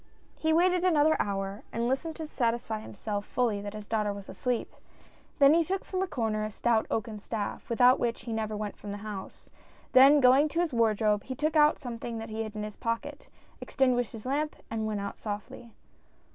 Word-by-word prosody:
" -, -, -35 dB
He 315 Hz, -, +1 dB
waited 355 Hz, +2 st, +3 dB
another 315 Hz, -3 st, +4 dB
hour, 195 Hz, 0 st, -2 dB
and 235 Hz, +1 st, -1 dB
listened 290 Hz, +5 st, -1 dB
to 320 Hz, -, -5 dB
satisfy 235 Hz, -5 st, -1 dB
him 215 Hz, -, -10 dB
self 205 Hz, 0 st, -3 dB
fully 220 Hz, -3 st, 0 dB
that 205 Hz, +1 st, -6 dB
his 210 Hz, -1 st, -8 dB
daughter 215 Hz, -2 st, 0 dB
was 200 Hz, -1 st, -8 dB
asleep, 240 Hz, +5 st, -3 dB, 0.6 s
then 280 Hz, +1 st, +7 dB
he 335 Hz, +1 st, +4 dB
took 380 Hz, +4 st, -3 dB
from 370 Hz, -1 st, -2 dB
a 380 Hz, -, 0 dB
corner 225 Hz, -8 st, -1 dB
a 215 Hz, -, -2 dB
stout 225 Hz, +1 st, +1 dB
oaken 220 Hz, -1 st, -3 dB
staff, 210 Hz, 0 st, -5 dB
without 245 Hz, +2 st, +5 dB
which 235 Hz, -1 st, -1 dB
he 230 Hz, -1 st, -4 dB
never 215 Hz, -1 st, -2 dB
went 210 Hz, -1 st, -4 dB
from 205 Hz, -, -10 dB
the 205 Hz, -, -4 dB
house, 200 Hz, -3 st, -8 dB, 0.4 s
then 275 Hz, +3 st, +8 dB
going 265 Hz, +3 st, +6 dB
to 330 Hz, -, -2 dB
his 345 Hz, -5 st, 0 dB
wardrobe 215 Hz, -2 st, +2 dB
he 260 Hz, -, -5 dB
took 305 Hz, +3 st, -1 dB
out 300 Hz, 0 st, +5 dB
something 235 Hz, -2 st, -6 dB
that 225 Hz, 0 st, -6 dB
he 220 Hz, +1 st, -3 dB
hid 215 Hz, -1 st, -5 dB
in 210 Hz, -, -3 dB
his 210 Hz, -1 st, -6 dB
pocket, 230 Hz, -, -4 dB, 0.4 s
extin 265 Hz, -2 st, +2 dB
guished 245 Hz, -2 st, 0 dB
his 225 Hz, 0 st, -9 dB
lamp 295 Hz, +4 st, -1 dB, 0.2 s
and 220 Hz, -1 st, -2 dB
went 210 Hz, -2 st, -2 dB
out 200 Hz, -, -5 dB
softly. 215 Hz, +3 st, -7 dB
230 Hz, 215 wpm, -29 LUFS, 215-280 Hz, 0.6 s, then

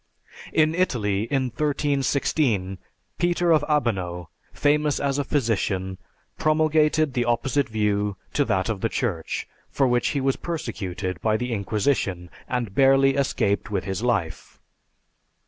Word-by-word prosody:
In 155 Hz, 0 st, +3 dB
Italy, 110 Hz, -, 0 dB
in 135 Hz, +2 st, 0 dB
1316, 140 Hz, -, 0 dB, 0.4 s
Peter 175 Hz, 0 st, +2 dB
of 155 Hz, -3 st, +4 dB
Abano, 95 Hz, -, -1 dB, 0.2 s
famous 150 Hz, 0 st, +1 dB
as 140 Hz, 0 st, 0 dB
a -, -, +1 dB
physician, 100 Hz, -9 st, -1 dB, 0.4 s
promulgated 155 Hz, -1 st, +2 dB
the 120 Hz, -2 st, 0 dB
opposite 130 Hz, +3 st, 0 dB
view 105 Hz, -2 st, 0 dB, 0.2 s
to -, -, +2 dB
that 95 Hz, -1 st, 0 dB
of 110 Hz, -4 st, -3 dB
the 115 Hz, -, +1 dB
Church, 95 Hz, -12 st, -2 dB, 0.2 s
for 135 Hz, -, +1 dB
which 120 Hz, -1 st, +2 dB
he 140 Hz, -, 0 dB
was 135 Hz, 0 st, 0 dB
persecuted 95 Hz, -, -4 dB
by 110 Hz, +1 st, +2 dB
the 125 Hz, +1 st, -3 dB
Inquisition, 100 Hz, -4 st, -1 dB, 0.2 s
and 120 Hz, -5 st, -2 dB
barely 135 Hz, +2 st, +5 dB
escaped 105 Hz, -7 st, 0 dB
with 100 Hz, -3 st, -1 dB
his 95 Hz, +1 st, -3 dB
life. 100 Hz, -10 st, -2 dB
120 Hz, 130 wpm, -24 LUFS, 100-145 Hz, 0.4 s, barely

